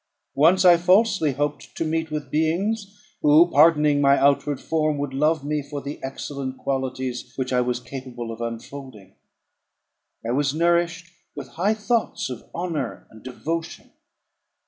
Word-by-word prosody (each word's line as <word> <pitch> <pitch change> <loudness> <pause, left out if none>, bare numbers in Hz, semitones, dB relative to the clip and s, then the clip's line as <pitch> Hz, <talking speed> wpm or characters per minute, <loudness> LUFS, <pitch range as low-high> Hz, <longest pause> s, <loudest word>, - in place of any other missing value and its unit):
Once 170 +7 +4
I 175 -1 +8
falsely 180 -3 +3
hoped 145 +2 -3
to 165 - -2
meet 160 0 -1
with 150 -3 -5
beings, 195 +6 -1 0.2
who, 155 +4 +5
pardoning 150 -1 +5
my 140 0 +5
outward 140 0 +2
form, 155 -2 0
would 140 -1 -3
love 150 +1 +1
me 150 0 -1
for 145 +1 -6
the 140 +1 -7
excellent 135 0 -5
qualities 130 -2 -3
which 130 -1 -3
I 125 - +3
was 125 0 -1
capable 120 -2 -7
of 115 +1 -8
unfolding. 115 -3 -8 1.1
I - - 0
was 140 +2 0
nourished 170 +1 +1 0.2
with 140 -3 -7
high 190 - 0
thoughts 215 - -1
of 125 - -9
honour 165 -8 -4
and 110 - -15
devotion. 165 +6 -5
145 Hz, 145 wpm, -23 LUFS, 130-165 Hz, 1.1 s, I